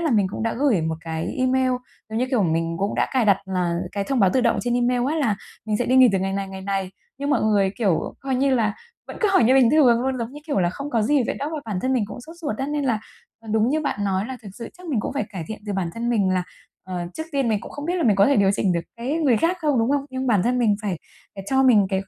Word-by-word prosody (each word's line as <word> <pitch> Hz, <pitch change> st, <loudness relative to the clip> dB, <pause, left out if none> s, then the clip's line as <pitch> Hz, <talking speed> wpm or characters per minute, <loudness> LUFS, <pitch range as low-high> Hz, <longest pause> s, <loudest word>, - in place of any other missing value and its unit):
là 325 Hz, -4 st, 0 dB
mình 205 Hz, -4 st, +3 dB
cũng 215 Hz, -, -5 dB
đã 230 Hz, -, -1 dB
gửi 260 Hz, -, +3 dB
một 160 Hz, 0 st, -1 dB
cái 165 Hz, -, -4 dB
email, 255 Hz, 0 st, +2 dB, 0.4 s
giống 220 Hz, +1 st, -3 dB
như 255 Hz, -, +1 dB
kiểu, 240 Hz, -6 st, +2 dB
mình 165 Hz, 0 st, 0 dB
cũng 200 Hz, +1 st, -1 dB
đã -, -, +1 dB
cài 255 Hz, -4 st, +2 dB
đặt 200 Hz, -2 st, +5 dB
là 180 Hz, -3 st, -1 dB, 0.3 s
thông 270 Hz, -3 st, 0 dB
báo 190 Hz, -2 st, +5 dB
tự 260 Hz, -, +3 dB
động 235 Hz, -1 st, +2 dB
trên 240 Hz, 0 st, -1 dB
email 245 Hz, 0 st, +1 dB
á -, -, -1 dB
là 230 Hz, -10 st, +1 dB, 0.3 s
mình 215 Hz, -, 0 dB
sẽ 245 Hz, -, -1 dB
đi 255 Hz, -, +3 dB
nghỉ 255 Hz, -1 st, +8 dB
từ 190 Hz, -, +2 dB
ngày 195 Hz, +1 st, -1 dB
này, 195 Hz, 0 st, -3 dB
ngày 190 Hz, 0 st, -8 dB
này. 195 Hz, -1 st, -2 dB, 0.3 s
Nhưng 285 Hz, +1 st, -2 dB
mọi 270 Hz, -, +2 dB
người, 205 Hz, -3 st, +3 dB
kiểu, 195 Hz, -8 st, 0 dB
coi 270 Hz, -1 st, -2 dB
như 270 Hz, +1 st, +2 dB
là 215 Hz, -4 st, +1 dB, 0.3 s
vẫn -, -, -8 dB
cứ 430 Hz, -, +3 dB
hỏi 245 Hz, -, +5 dB
như 255 Hz, -, +5 dB
bình 260 Hz, -3 st, +5 dB
thường 255 Hz, -7 st, +5 dB
luôn, 260 Hz, -1 st, -1 dB
giống 235 Hz, +2 st, -4 dB
như 295 Hz, -, -9 dB
kiểu 285 Hz, -, 0 dB
là, 175 Hz, 0 st, +2 dB
không 280 Hz, +8 st, -6 dB
có 230 Hz, -4 st, +1 dB
gì 275 Hz, +4 st, +3 dB
vậy -, -, -1 dB
đó, 290 Hz, +2 st, -3 dB
bản 210 Hz, -5 st, -3 dB
thân 260 Hz, -, +1 dB
mình 245 Hz, -5 st, +1 dB
cũng -, -, -8 dB
sốt 330 Hz, +1 st, -11 dB
ruột 295 Hz, -11 st, -4 dB
á. 270 Hz, -, -2 dB
Nên 295 Hz, -1 st, -2 dB
là, 230 Hz, -5 st, +1 dB, 0.4 s
ờ, 225 Hz, -, -14 dB
đúng 220 Hz, +2 st, +3 dB
như 310 Hz, -, +1 dB
bạn 245 Hz, -9 st, -2 dB
nói 195 Hz, +1 st, 0 dB
là 260 Hz, 0 st, -6 dB
thực 205 Hz, -, -9 dB
sự 235 Hz, +1 st, -7 dB
chắc 360 Hz, -, -12 dB
mình 265 Hz, -9 st, 0 dB
cũng -, -, -4 dB
phải 210 Hz, -, -1 dB
cải 180 Hz, -5 st, -5 dB
thiện 220 Hz, -, -5 dB
từ 205 Hz, -, -2 dB
bản 185 Hz, -3 st, -2 dB
thân 235 Hz, +1 st, -2 dB
mình 200 Hz, -5 st, +2 dB
là, 185 Hz, -1 st, +1 dB, 0.4 s
ờ, 185 Hz, -1 st, -4 dB
trước 315 Hz, -, -4 dB
tiên 275 Hz, -4 st, +1 dB
mình 210 Hz, -3 st, +1 dB
cũng -, -, -10 dB
không 290 Hz, -, -7 dB
biết 355 Hz, -, 0 dB
là 345 Hz, -, 0 dB
mình 215 Hz, -8 st, +3 dB
có 200 Hz, -, +5 dB
thể 280 Hz, -, +3 dB
điều 195 Hz, -1 st, +4 dB
chỉnh 195 Hz, -2 st, +1 dB
được 170 Hz, -, 0 dB, 0.2 s
cái 245 Hz, +5 st, -3 dB
người 290 Hz, -8 st, +3 dB
khác 340 Hz, -, +1 dB
không, 295 Hz, -5 st, +1 dB
đúng 230 Hz, +3 st, +2 dB
hông? 285 Hz, -1 st, +1 dB
Nhưng 260 Hz, 0 st, -3 dB
bản 210 Hz, -7 st, +3 dB
thân 250 Hz, +3 st, +1 dB
mình 220 Hz, -4 st, +3 dB
phải 190 Hz, -6 st, -2 dB, 0.4 s
phải 195 Hz, -1 st, -8 dB
cho 265 Hz, 0 st, +4 dB
mình 215 Hz, -7 st, +5 dB
cái 190 Hz, -1 st, 0 dB
230 Hz, 310 wpm, -23 LUFS, 195-265 Hz, 0.4 s, nghỉ